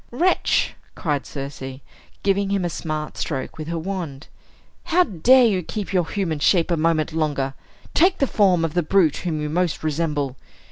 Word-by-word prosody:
"Wretch," 350 +10 +2 0.2
cried 145 -4 -2
Circe, 135 -2 -6 0.4
giving 200 0 +1
him 195 -2 0
a 175 - -2
smart 155 -1 -4
stroke 140 0 -4
with 155 - -5
her 170 0 -2
wand, 165 -5 -5 0.6
"how 355 +2 +4
dare 245 - +5
you 195 -5 +2
keep 200 +3 -5
your 180 -3 +1
human 175 -7 -2
shape 170 +3 +3
a - - +3
moment 160 -1 +1
longer! 145 -4 -1 0.4
Take 365 +3 +4
the 275 - +2
form 185 -9 +3
of 160 - -3
the 175 - +2
brute 165 -2 +3
whom 165 -4 -2
you 150 - -2
most 170 +1 -1
resemble. 150 -4 -1
165 Hz, 175 wpm, -22 LUFS, 150-195 Hz, 0.6 s, dare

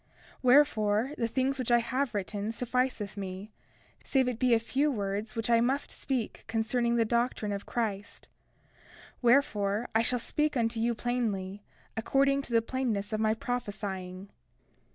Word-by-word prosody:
31:2 - - -39 0.3
Wherefore, 245 -3 +4
the 230 - 0
things 265 +3 0
which 250 - -2
I 240 - +6
have 240 +1 -1
written 205 +2 -2
sufficeth 245 -3 -1
me, 195 +2 -6 0.5
save 265 -2 +2
it 245 -2 -2
be 250 -2 +4
a - - +3
few 275 +6 +1
words 205 0 -3
which 225 -1 -2
I 230 -1 +4
must 265 +4 0
speak 255 -5 -3
concerning 235 +2 0
the 230 -1 +3
doctrine 235 -2 0
of 200 0 -4
Christ; 210 -4 -3 0.9
wherefore, 235 -4 +2
I 220 - +4
shall 245 +2 +2
speak 300 +4 0
unto 230 -1 0
you 235 +1 +1
plainly, 210 -5 -2 0.3
according 275 +4 +2
to 270 - -10
the 230 -1 +4
plainness 230 -5 -2
of 215 - 0
my 220 0 +2
prophesying. 200 -5 -4
230 Hz, 155 wpm, -30 LUFS, 210-250 Hz, 0.9 s, I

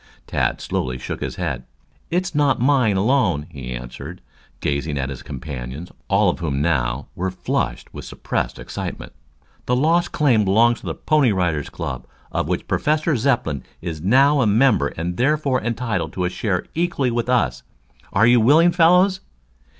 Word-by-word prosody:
Tad - - -1
slowly 65 0 -2
shook - - -6
his - - -4
head. 65 -2 -3 0.5
"It's 180 +1 -1
not 145 -2 +2
mine 125 -6 +3
alone," 95 - +2
he 65 -5 -7
answered, 60 +8 -7 0.4
gazing 70 +1 -2
at 70 0 -2
his 65 - -7
companions, 70 +3 -7 0.2
all 100 +1 +3
of 90 - 0
whom, 70 -5 -2
now, 70 -4 0
were 95 +2 -2
flushed - - -3
with - - -8
suppressed - - -3
excitement. - - -6 0.5
"The 125 - +2
Lost 165 +6 +2
Claim 125 -8 +3
belongs 115 +5 +3
to - - -10
the - - -3
Pony 150 -6 +2
Rider 90 -6 0
Boys 75 - -7
Club, - - -6 0.2
of - - -1
which - - -2
Professor 155 +1 +1
Zepplin 115 - 0 0.2
is 80 -3 -5
now 135 - +4
a 115 - +3
member 105 - +3
and 85 +4 -4
therefore 140 0 +1
entitled 110 -9 -2
to 90 -1 -1
share 90 -1 -2
equally 160 -7 0
with 120 +1 -2
us. 70 - +1 0.5
Are 105 +3 +4
you 120 0 +5
willing, 160 +9 +5
fellows?" 180 +3 +4
105 Hz, 165 wpm, -21 LUFS, -, 0.5 s, you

